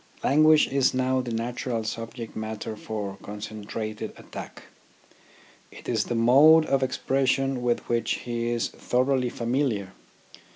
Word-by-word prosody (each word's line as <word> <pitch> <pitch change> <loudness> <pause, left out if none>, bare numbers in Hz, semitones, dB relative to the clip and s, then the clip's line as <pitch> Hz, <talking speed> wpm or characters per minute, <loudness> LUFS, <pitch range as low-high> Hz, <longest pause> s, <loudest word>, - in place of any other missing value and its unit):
Language 155 +2 +5
is 135 -1 +2
now 130 0 +1
the 125 -2 -5
natural 115 0 -2
subject 115 +1 -6
matter 110 0 -5
for 105 -2 -5
concentrated 110 +1 -6
attack. - - -9 1.1
It - - -13
is 110 -3 0
the 120 - -2
mode 145 +8 +6
of 135 -2 +1
expression 135 0 0
with 120 -1 -1
which 120 0 0
he 120 -1 -2
is 120 -1 -1
thoroughly 125 0 0
familiar. 120 -5 -1
120 Hz, 125 wpm, -26 LUFS, 110-130 Hz, 1.1 s, mode